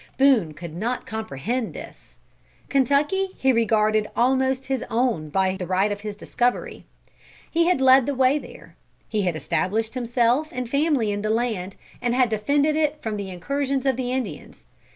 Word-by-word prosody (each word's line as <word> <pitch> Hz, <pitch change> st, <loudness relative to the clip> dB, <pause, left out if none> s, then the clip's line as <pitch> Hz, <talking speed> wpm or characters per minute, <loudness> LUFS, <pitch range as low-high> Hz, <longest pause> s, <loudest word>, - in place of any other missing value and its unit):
Boone 260 Hz, -, +4 dB
could 170 Hz, 0 st, -8 dB
not 235 Hz, +7 st, -3 dB
comprehend 220 Hz, -, -3 dB
this. -, -, -11 dB, 0.5 s
Kentucky 295 Hz, +8 st, +1 dB
he 265 Hz, -, +3 dB
regarded 215 Hz, -2 st, +2 dB
almost 260 Hz, +2 st, +1 dB
his 265 Hz, -1 st, -2 dB
own 225 Hz, -10 st, 0 dB
by 190 Hz, +3 st, +1 dB
the 185 Hz, -2 st, -5 dB
right 190 Hz, +3 st, +1 dB
of 205 Hz, 0 st, -4 dB
his 210 Hz, -1 st, -5 dB
discovery. 245 Hz, +4 st, -2 dB, 0.7 s
He 335 Hz, +1 st, +2 dB
had 360 Hz, -5 st, +2 dB
led 265 Hz, -1 st, +6 dB
the 285 Hz, -, -1 dB
way 260 Hz, +3 st, +3 dB
there. -, -, -13 dB, 0.3 s
He 215 Hz, -2 st, -1 dB
had 180 Hz, -4 st, 0 dB
established 215 Hz, +7 st, -1 dB
himself 245 Hz, +4 st, +1 dB
and 250 Hz, -1 st, -4 dB
family 280 Hz, -4 st, +1 dB
in 205 Hz, 0 st, -2 dB
the 215 Hz, -, -2 dB
land, 220 Hz, -5 st, -1 dB, 0.3 s
and 245 Hz, -1 st, 0 dB
had 250 Hz, -2 st, +3 dB
defended 285 Hz, +8 st, +1 dB
it 305 Hz, -1 st, 0 dB
from 220 Hz, -2 st, -2 dB
the 200 Hz, -2 st, -5 dB
incursions 275 Hz, +9 st, -2 dB
of 265 Hz, -2 st, +2 dB
the 250 Hz, 0 st, -3 dB
Indians. 260 Hz, 0 st, -5 dB
240 Hz, 170 wpm, -23 LUFS, 210-265 Hz, 0.7 s, led